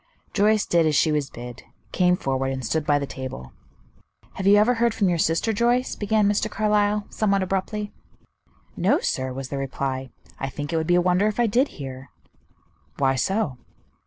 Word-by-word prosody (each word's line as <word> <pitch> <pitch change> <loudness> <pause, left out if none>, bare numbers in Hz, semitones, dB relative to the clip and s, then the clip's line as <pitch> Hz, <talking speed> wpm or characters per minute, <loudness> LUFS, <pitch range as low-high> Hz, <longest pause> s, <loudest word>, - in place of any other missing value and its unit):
Joyce 215 +1 +3
did 170 -2 +3
as 155 - +1
she 155 +2 +3
was 145 -2 -1
bid, 120 +1 -9 0.3
came 180 -1 +3
forward, 135 -2 -1
and 130 -2 -4
stood 155 +6 -1
by 145 -1 +4
the 140 - -2
table. 130 - -7 0.8
"Have 190 - -3
you 200 - +7
ever 215 +4 +4
heard 235 -1 +1
from 195 -3 +2
your 170 -1 0
sister, 165 +8 +1
Joyce?" 240 +3 +1
began 210 0 +1
Mr. 210 +1 +1
Carlyle, 210 -1 +1
somewhat 200 -3 +1
abruptly. 200 +3 -3 0.8
"No, - - +2
sir," 130 0 -2
was 130 0 -6
the 140 - -3
reply; 135 -1 -3 0.3
"I 135 - -3
think 145 +3 -5
it - - +1
would 160 0 -1
be 175 - +4
a 180 - +4
wonder 180 +3 +2
if 215 +2 -2
I 240 - +4
did 245 +6 +2
hear." 135 -1 -8 0.9
"Why 135 -1 +2
so?" 140 - -1
175 Hz, 190 wpm, -24 LUFS, 135-210 Hz, 0.9 s, you